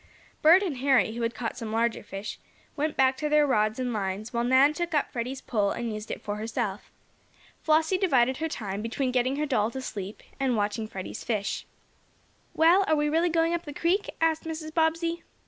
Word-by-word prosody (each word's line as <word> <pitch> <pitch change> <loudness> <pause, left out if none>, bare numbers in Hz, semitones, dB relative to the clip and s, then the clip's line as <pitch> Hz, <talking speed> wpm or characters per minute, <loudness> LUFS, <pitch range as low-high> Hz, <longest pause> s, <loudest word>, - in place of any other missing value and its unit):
Bert 340 +6 +7
and 325 -9 -2
Harry, 260 -4 +3
who 235 - -5
had 230 0 -1
caught 230 -2 -4
some 225 -3 -5
larger 230 +1 0
fish, 200 0 -7 0.4
went 300 +1 -2
back 265 0 +4
to 300 - -2
their 300 0 +5
rods 215 -4 +1
and 250 -2 -1
lines, 205 +2 -3
while 235 0 0
Nan 260 +4 +5
took 340 0 -2
up 290 - +1
Freddie's 255 +2 -4
pole 205 -4 0
and 230 +1 -3
used 215 0 -7
it - - -5
for 205 0 -3
herself. 220 -2 -3 0.7
Flossie 320 +4 +2
divided 260 -9 +3
her 320 +1 -2
time 200 -6 -4
between 250 +4 -1
getting 255 +1 +1
her 300 +1 -1
doll 220 -7 +1
to 265 - -6
"sleep" 205 -5 -6 0.2
and 260 -4 +1
watching 210 +2 -1
Freddie's 190 -3 -7
fish. 205 -4 -2 0.9
"Well, 340 +5 +5
are 315 - +3
we 295 0 +1
really 330 +3 +2
going 330 0 +2
up 340 - -1
the 295 - -7
creek?" 355 +7 0
asked 325 -1 +1
Mrs. 315 -1 -5
Bobbsey. 330 +1 +1
260 Hz, 200 wpm, -27 LUFS, 220-315 Hz, 0.9 s, Bert